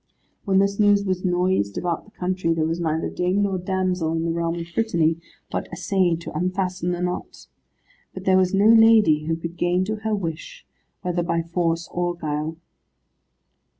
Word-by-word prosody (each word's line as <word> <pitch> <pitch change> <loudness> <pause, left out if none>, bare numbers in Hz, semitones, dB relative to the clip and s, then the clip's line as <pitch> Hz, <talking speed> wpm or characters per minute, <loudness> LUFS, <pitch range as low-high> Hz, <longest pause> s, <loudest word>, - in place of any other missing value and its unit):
When 195 -2 +2
this 200 +1 +2
news 205 -1 +4
was 185 -1 -1
noised 180 - +1
about 175 -2 -2
the - - -18
country, 180 -2 0
there 160 -1 +1
was 165 +2 -2
neither 160 -1 -1
dame 185 +3 0
nor 195 -2 -1
damsel 180 -3 -1
in 165 0 -1
the 165 - 0
realm 165 0 -1
of 170 -1 -5
Brittany, 170 -8 +1 0.3
but - - -3
essayed 180 -4 0
to 170 - -8
unfasten 180 +1 -1
the 175 0 -2
knot. 180 0 -4 0.7
But 185 0 -8
there 190 - +4
was 185 -1 +2
no 200 +1 +3
lady 220 -9 +6
who 165 +1 0
could 170 +1 -7
gain 180 +2 +1
to 215 +2 -3
her 215 0 -1
wish, 195 - -6 0.4
whether 175 -1 0
by 170 -1 -1
force 170 0 -1
or 175 0 -1
guile. 155 0 -3
180 Hz, 180 wpm, -23 LUFS, 165-190 Hz, 0.7 s, lady